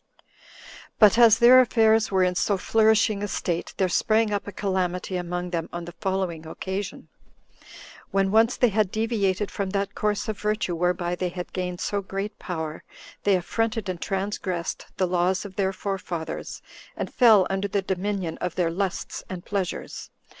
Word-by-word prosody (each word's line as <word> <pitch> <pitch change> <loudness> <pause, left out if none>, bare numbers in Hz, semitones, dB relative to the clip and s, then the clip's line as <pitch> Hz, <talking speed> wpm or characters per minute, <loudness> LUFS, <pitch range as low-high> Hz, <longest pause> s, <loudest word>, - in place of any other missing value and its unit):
5. - - -31 0.7
But 210 0 +6
as 225 -2 +7
their 245 +2 +8
affairs 220 -2 +3
were 190 -1 +2
in 180 0 +2
so 195 +2 +1
flourishing 220 +1 +3
a 205 - -1
state, 175 -3 -3
there 190 - +2
sprang 215 +4 +2
up 205 - -2
a - - -4
calamity 185 -1 -2
among 180 0 -3
them 165 -2 -2
on 175 0 -5
the 175 - -8
following 190 -4 -2
occasion. 190 +4 -5 1.0
When 195 0 +1
once 225 +3 +4
they 245 - +4
had 210 -1 +1
deviated 210 -3 0
from 200 -2 -3
that 200 0 -2
course 210 -1 -1
of 215 -2 -4
virtue 210 -3 -1
whereby 175 +1 0
they 180 0 -2
had 180 0 -7
gained 180 -1 -3
so 205 -1 -1
great 195 +2 -5
power, 160 -3 -5 0.4
they 200 -1 +5
affronted 220 +3 -1
and 180 -2 -4
transgressed 190 -3 -3
the 185 - +2
laws 180 +2 0
of 195 -2 -9
their 190 -1 +1
forefathers, 185 -4 -5 0.3
and - - -4
fell 220 -6 +6
under 195 +1 -1
the 200 0 -1
dominion 190 -2 -2
of 180 -2 -3
their 175 -3 +1
lusts 190 +1 -3
and 180 -2 -7
pleasures. 195 -3 -4
195 Hz, 170 wpm, -25 LUFS, 180-210 Hz, 1.0 s, their